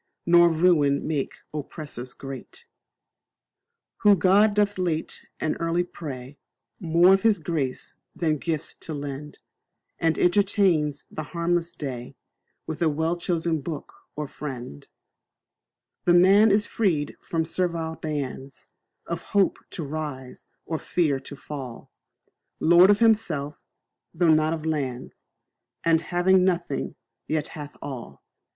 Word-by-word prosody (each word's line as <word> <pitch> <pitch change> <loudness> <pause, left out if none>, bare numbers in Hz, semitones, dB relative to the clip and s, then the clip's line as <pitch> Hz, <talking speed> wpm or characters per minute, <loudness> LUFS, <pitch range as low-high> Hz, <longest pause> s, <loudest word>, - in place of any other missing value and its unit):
Nor 175 0 +6
ruin 155 -4 +3
make 150 -4 -2 0.2
oppressors 145 -4 -6
great, 135 -2 -9 1.3
Who 205 -1 +6
God 200 +4 +4
doth 205 -2 +1
late 165 -3 -2
and 155 - -1
early 170 +1 +1
pray 140 -6 -8 0.4
More 175 0 +5
of 195 - +3
His 220 -1 +4
grace 145 -7 -3 0.2
than 155 -3 0
gifts 160 -2 -2
to 160 - -5
lend; 145 +1 -7 0.6
And 165 -1 +1
entertains 180 -6 +2
the - - -5 0.2
harmless 170 0 0
day 125 -4 -6 0.5
With 160 - -6
a 165 - +4
well 160 +3 0
chosen 170 -2 -1
book 150 +1 -6 0.2
or 150 -1 -3
friend; 125 - -8 1.2
This 175 - +5
man 195 +5 +6
is 205 +2 +3
freed 165 -10 0
from 165 -1 -1
servile 165 -1 -1
bands, 140 -3 -5 0.4
Of 170 0 -4
hope 200 -2 +1
to 170 - -5
rise 145 -3 -6 0.2
or 160 -2 -3
fear 150 -6 0
to 140 +2 -9
fall; 135 -4 -8 0.7
Lord 175 +3 +6
of 205 - +6
himself, 205 -11 +1 0.6
though 165 -1 +4
not 155 0 +2
of 160 -1 -5
lands, 135 -6 -3 0.6
And 165 -1 +4
having 180 +3 +3
nothing, 175 -6 -1 0.3
yet 155 -1 -1
hath 145 -2 -9
all. 120 - -8
160 Hz, 125 wpm, -25 LUFS, 145-175 Hz, 1.3 s, Nor